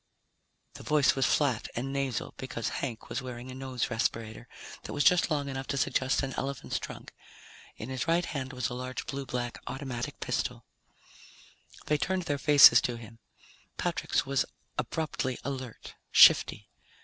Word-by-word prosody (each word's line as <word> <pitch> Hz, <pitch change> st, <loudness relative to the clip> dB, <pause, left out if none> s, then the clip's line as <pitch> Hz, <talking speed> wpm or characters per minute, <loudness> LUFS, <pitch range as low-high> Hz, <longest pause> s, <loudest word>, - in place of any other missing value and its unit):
The -, -, -11 dB
voice 150 Hz, -3 st, +3 dB
was 135 Hz, -2 st, +2 dB
flat 135 Hz, -7 st, +1 dB
and 135 Hz, +3 st, -3 dB
nasal 135 Hz, -4 st, -2 dB
because 115 Hz, -3 st, -4 dB
Hank 120 Hz, -5 st, -5 dB
was -, -, -3 dB
wearing 125 Hz, 0 st, -7 dB
a -, -, -7 dB
nose 130 Hz, -2 st, -3 dB
respirator 115 Hz, 0 st, -2 dB, 0.3 s
that -, -, -7 dB
was 145 Hz, -, +1 dB
just 180 Hz, -1 st, +4 dB
long 145 Hz, -3 st, -1 dB
enough 135 Hz, -1 st, -5 dB
to 140 Hz, -, -2 dB
suggest 130 Hz, 0 st, +1 dB
an 135 Hz, -1 st, -3 dB
elephant's 140 Hz, -1 st, -3 dB
trunk. -, -, -9 dB, 0.6 s
In 110 Hz, -, -7 dB
his 130 Hz, +3 st, -3 dB
right 170 Hz, +1 st, +2 dB
hand 135 Hz, -3 st, -4 dB
was 125 Hz, -3 st, -2 dB
a 120 Hz, -, -6 dB
large 130 Hz, 0 st, -5 dB
blue 135 Hz, -1 st, -5 dB
black 120 Hz, -1 st, -3 dB
automatic 130 Hz, -3 st, -5 dB
pistol. -, -, -2 dB, 1.2 s
They 150 Hz, -1 st, +1 dB
turned 190 Hz, +2 st, 0 dB
their 145 Hz, -3 st, -2 dB
faces 140 Hz, -4 st, +8 dB
to 120 Hz, -1 st, -2 dB
him. 115 Hz, 0 st, -12 dB, 0.6 s
Patrick's -, -, 0 dB
was 135 Hz, 0 st, +1 dB, 0.3 s
abruptly 145 Hz, -5 st, -2 dB
alert, 130 Hz, -4 st, -6 dB, 0.2 s
shifty. -, -, +6 dB
130 Hz, 160 wpm, -29 LUFS, 125-140 Hz, 1.2 s, faces